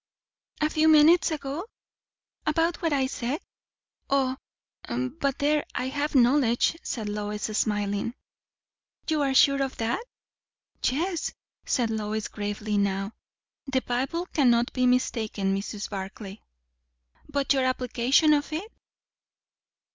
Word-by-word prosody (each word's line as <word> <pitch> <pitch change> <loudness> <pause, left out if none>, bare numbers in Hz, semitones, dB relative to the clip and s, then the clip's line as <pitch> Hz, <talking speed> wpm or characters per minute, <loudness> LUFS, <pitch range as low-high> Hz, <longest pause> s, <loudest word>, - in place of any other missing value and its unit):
"A 305 - +3
few 310 0 +3
minutes 315 +2 +6
ago? 300 +1 -4 0.8
About 325 +3 +1
what 330 -2 +1
I 275 -2 +2
said? 260 +2 -3 0.7
O, 265 -2 +2 0.5
but 260 +3 -2
there 295 +1 +2
I 255 +1 -1
have 290 +2 -2
knowledge," 245 +1 +4
said 220 -5 -4
Lois, 210 0 -3
smiling. 205 +2 0 0.9
"You 310 -2 +1
are 270 -2 +1
sure 275 +1 +5
of 270 -1 -2
that?" 230 - -1 0.8
"Yes," 335 +6 -1 0.3
said 235 -4 +1
Lois, 215 0 -2
gravely 205 0 -2
now. 195 +1 -1 0.5
"The 265 -1 0
Bible 270 +8 -1
cannot 240 -5 +3
be 255 -1 +2
mistaken, 220 -6 +1
Mrs. 205 +1 -4
Barclay." 195 +1 -7 0.9
"But 280 -1 +1
your 265 -2 +1
application 255 +4 +3
of 290 +1 0
it?" 365 +9 -4
255 Hz, 115 wpm, -26 LUFS, 220-295 Hz, 0.9 s, minutes